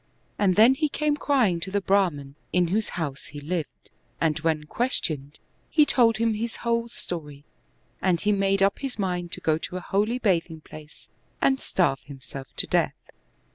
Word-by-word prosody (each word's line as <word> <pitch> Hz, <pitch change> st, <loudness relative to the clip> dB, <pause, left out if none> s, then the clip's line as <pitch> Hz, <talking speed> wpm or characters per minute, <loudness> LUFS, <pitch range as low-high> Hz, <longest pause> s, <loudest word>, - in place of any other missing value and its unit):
And 190 Hz, -3 st, +3 dB
then 225 Hz, +5 st, +7 dB
he 305 Hz, +3 st, 0 dB
came 300 Hz, 0 st, 0 dB
crying 250 Hz, -, +2 dB
to 180 Hz, -, -5 dB
the 200 Hz, +1 st, +1 dB
Brahman, 180 Hz, -9 st, +1 dB, 0.2 s
in 180 Hz, -2 st, +2 dB
whose 210 Hz, +4 st, 0 dB
house 145 Hz, -5 st, -4 dB
he 145 Hz, -, -8 dB
lived, 160 Hz, +2 st, -5 dB, 0.3 s
and 160 Hz, -1 st, +1 dB
when 155 Hz, -1 st, 0 dB
questioned, 150 Hz, -, -2 dB, 0.3 s
he 305 Hz, -2 st, +5 dB
told 235 Hz, -5 st, +3 dB
him 230 Hz, 0 st, +2 dB
his 225 Hz, +2 st, -3 dB
whole 235 Hz, 0 st, +1 dB
story: 150 Hz, -10 st, -6 dB, 0.6 s
and 180 Hz, -3 st, +2 dB
he 210 Hz, -, +1 dB
made 195 Hz, -1 st, +2 dB
up 200 Hz, 0 st, +2 dB
his 270 Hz, -2 st, -4 dB
mind 180 Hz, -4 st, -2 dB
to -, -, -1 dB
go 155 Hz, 0 st, +1 dB
to 180 Hz, -, -5 dB
a -, -, -3 dB
holy 210 Hz, +6 st, 0 dB
bathing 170 Hz, -8 st, 0 dB
place, 150 Hz, 0 st, -13 dB, 0.3 s
and 265 Hz, -1 st, +3 dB
starve 170 Hz, -8 st, +1 dB
himself 135 Hz, -1 st, -9 dB
to -, -, 0 dB
death. -, -, +1 dB
185 Hz, 175 wpm, -26 LUFS, 155-225 Hz, 0.6 s, then